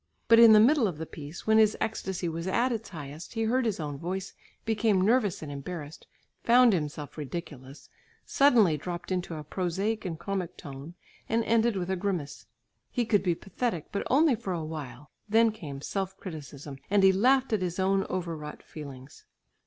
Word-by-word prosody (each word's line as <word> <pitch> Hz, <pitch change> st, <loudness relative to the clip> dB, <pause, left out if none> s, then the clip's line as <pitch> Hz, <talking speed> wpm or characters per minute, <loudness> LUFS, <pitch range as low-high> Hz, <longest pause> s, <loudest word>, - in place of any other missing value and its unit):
But 230 Hz, 0 st, +7 dB
in 230 Hz, -1 st, +9 dB
the 215 Hz, -, +8 dB
middle 245 Hz, +1 st, +5 dB
of 175 Hz, -6 st, -4 dB
the 160 Hz, -, -5 dB
piece, 155 Hz, +1 st, -9 dB
when 220 Hz, 0 st, +5 dB
his 215 Hz, -1 st, +4 dB
ecstasy 190 Hz, -5 st, -2 dB
was 165 Hz, +2 st, -4 dB
at 240 Hz, +7 st, +1 dB
its 225 Hz, -2 st, -4 dB
highest, 150 Hz, +2 st, -9 dB
he 225 Hz, -, 0 dB
heard 245 Hz, +3 st, +1 dB
his 210 Hz, -, -2 dB
own 145 Hz, -3 st, -4 dB
voice, 185 Hz, +3 st, -4 dB, 0.3 s
became 220 Hz, -3 st, +2 dB
nervous 205 Hz, -3 st, +2 dB
and 145 Hz, -, -6 dB
embarrassed, 145 Hz, +2 st, -7 dB, 0.4 s
found 240 Hz, -1 st, +6 dB
himself 150 Hz, -3 st, -4 dB
ridiculous, 145 Hz, -3 st, -7 dB, 0.4 s
suddenly 230 Hz, -, +4 dB
dropped 175 Hz, +4 st, -6 dB
into 180 Hz, -2 st, -2 dB
a 155 Hz, -, -6 dB
prosaic 190 Hz, +7 st, -2 dB
and 175 Hz, -4 st, -4 dB
comic 190 Hz, 0 st, -4 dB
tone 140 Hz, +4 st, -9 dB, 0.3 s
and 230 Hz, +1 st, +2 dB
ended 230 Hz, 0 st, +2 dB
with 185 Hz, -1 st, -2 dB
a -, -, +1 dB
grimace; 175 Hz, -, -4 dB, 0.4 s
he 240 Hz, -, -1 dB
could 210 Hz, -3 st, +3 dB
be 175 Hz, -3 st, +1 dB
pathetic, 195 Hz, -2 st, -4 dB
but 200 Hz, -, -2 dB
only 295 Hz, +2 st, +4 dB
for 220 Hz, -5 st, -3 dB
a 165 Hz, -3 st, -3 dB
while; 145 Hz, -3 st, -8 dB, 0.2 s
then 225 Hz, +1 st, +4 dB
came 150 Hz, -11 st, -8 dB
self 195 Hz, +3 st, -3 dB
criticism 145 Hz, -5 st, -8 dB
and 200 Hz, -1 st, +3 dB
he 190 Hz, -, +8 dB
laughed 255 Hz, +6 st, +3 dB
at 210 Hz, -, +1 dB
his 180 Hz, -1 st, -2 dB
own 195 Hz, +1 st, +2 dB
overwrought 165 Hz, -5 st, -5 dB
feelings. 140 Hz, -3 st, -11 dB
185 Hz, 185 wpm, -28 LUFS, 155-220 Hz, 0.4 s, in